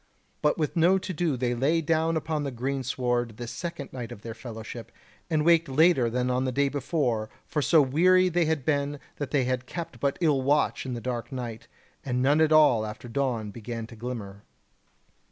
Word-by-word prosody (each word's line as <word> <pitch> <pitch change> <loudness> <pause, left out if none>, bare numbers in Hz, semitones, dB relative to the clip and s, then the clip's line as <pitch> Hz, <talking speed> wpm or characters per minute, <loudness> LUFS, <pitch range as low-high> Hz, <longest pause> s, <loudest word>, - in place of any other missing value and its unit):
But 150 - +2
with 155 -3 -1
no 175 +3 +4
to 185 0 -4
do 160 -4 0
they 120 0 0
lay 140 +7 +2
down 165 0 +1
upon 155 -1 -2
the 140 - -2
greensward 125 -2 -2
this 120 -1 -6
second 160 +1 -6
night 120 -3 -6
of 105 - -10
their 115 - -5
fellowship, 115 0 -8 0.4
and 155 -2 +1
waked 170 -2 +4
later 135 -3 +4
than 125 +2 0
on 125 +1 +1
the 130 - -1
day 140 +2 +1
before; 130 -6 -1 0.2
for 150 - -1
so 155 +1 +5
weary 180 +7 +4
had - - -13
they 165 -2 +2
been, 145 0 -1 0.2
that 145 -3 -4
they 140 -3 +2
had 130 0 -2
kept 165 -7 -6
but 140 +2 0
ill 150 -6 +2
watch 140 0 +1
in 125 - -3
the 120 - -5
dark 120 +1 -4
night, 115 -3 -6 0.4
and 125 -2 -1
none 145 +4 +4
at 160 0 +3
all 150 -8 +6
after 110 +3 -7
dawn 120 -4 -1
began 115 +1 -6
to 115 - -12
glimmer. 110 -4 -6
135 Hz, 200 wpm, -27 LUFS, 120-155 Hz, 0.4 s, all